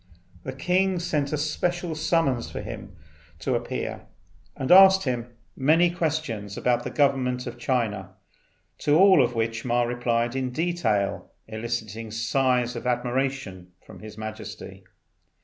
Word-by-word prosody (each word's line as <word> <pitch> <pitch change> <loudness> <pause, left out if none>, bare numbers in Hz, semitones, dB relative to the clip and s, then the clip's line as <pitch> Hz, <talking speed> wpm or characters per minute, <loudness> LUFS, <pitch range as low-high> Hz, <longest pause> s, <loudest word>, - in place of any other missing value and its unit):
The 130 - -5
king 185 +6 +1
sent 150 -5 -1
a 150 - 0
special 170 +3 -1
summons 155 -6 0
for - - -6
him - - -8 0.4
to 80 - -2
appear, - - -4 0.5
and 130 - -2
asked 190 +1 +8
him 125 -3 -2 0.3
many 165 +6 +3
questions 155 - -3
about 125 -1 +1
the - - -4
government 130 -3 +1
of 120 -1 -7
China, 110 -7 -2 0.6
to 150 +1 +3
all 190 -4 +7
of 120 0 -2
which 115 0 -1
Ma 120 -1 +1
replied 120 0 -1
in 130 -1 -1
detail, 125 - -1 0.2
eliciting 110 -1 -4
sighs 125 +2 0
of 120 - -5
admiration 125 -7 -2
from - - -13
His 110 0 -11
Majesty. 110 0 -8
125 Hz, 135 wpm, -25 LUFS, 115-155 Hz, 0.6 s, asked